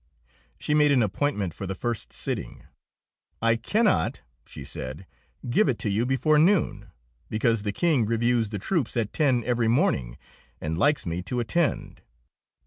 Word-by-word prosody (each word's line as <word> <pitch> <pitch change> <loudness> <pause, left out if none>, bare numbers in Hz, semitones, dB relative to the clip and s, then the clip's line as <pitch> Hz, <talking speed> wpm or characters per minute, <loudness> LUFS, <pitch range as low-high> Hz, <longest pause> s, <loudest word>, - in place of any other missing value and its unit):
She 150 - -2
made 150 -1 +4
an 130 -4 +4
appointment 105 - -1
for 95 - -6
the 95 - -3
first 120 +3 -4
sitting. - - -5 0.8
"I 115 0 +3
cannot," 210 - +1 0.3
she - - -9
said, 65 +9 -7 0.4
"give 125 - +3
it 125 - 0
to 105 - -2
you 110 +5 0
before 135 +4 +3
noon, 180 +3 +2 0.4
because 115 0 +1
the 105 0 -2
King 140 - +1
reviews 115 0 +1
the 105 - -4
troops 130 - -1
at 110 -3 -1
ten 130 -6 +2
every 120 -1 +1
morning 65 - +1 0.4
and 80 +1 -3
likes 145 - +2
me 85 +1 -2
to 125 +7 -3
attend." 155 +8 -1
120 Hz, 155 wpm, -26 LUFS, 105-145 Hz, 0.8 s, made